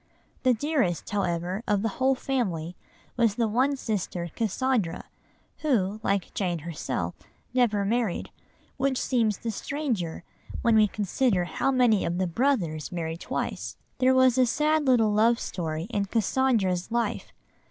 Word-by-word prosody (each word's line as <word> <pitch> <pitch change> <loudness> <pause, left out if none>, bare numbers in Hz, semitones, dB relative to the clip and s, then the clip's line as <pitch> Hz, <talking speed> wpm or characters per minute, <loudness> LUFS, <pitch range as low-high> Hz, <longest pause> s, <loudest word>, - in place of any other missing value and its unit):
The 255 -2 +3
dearest, 260 - 0
however, 180 -1 -1
of 205 -1 +1
the - - +2
whole 265 +1 +3
family 180 -12 -2 0.4
was 230 -4 +3
the 230 -1 +1
one 255 +6 +2
sister 185 - -3
Cassandra, 225 -4 0 0.6
who, 215 -9 +1
like 200 -3 -1
Jane 180 -4 -1
herself, 165 0 -3 0.4
never 220 -6 +2
married, 225 -2 -1 0.5
which 270 -1 +1
seems 225 -6 +1
the 230 - -3
stranger 220 - -3 0.4
when 230 -1 +4
we 215 -1 +6
consider 205 0 0
how 175 - -1
many 245 -6 +3
of 175 - -1
the 185 - +1
brothers 175 - 0
married 165 -2 -4
twice. - - -4 0.2
There 260 0 +4
was 260 -1 +5
a 255 - +5
sad 300 +3 +1
little 225 -5 +4
love 230 +3 +4
story 160 -3 -3
in 205 -3 0
Cassandra's 215 -3 +1
life. 235 0 -1
220 Hz, 140 wpm, -27 LUFS, 180-255 Hz, 0.6 s, we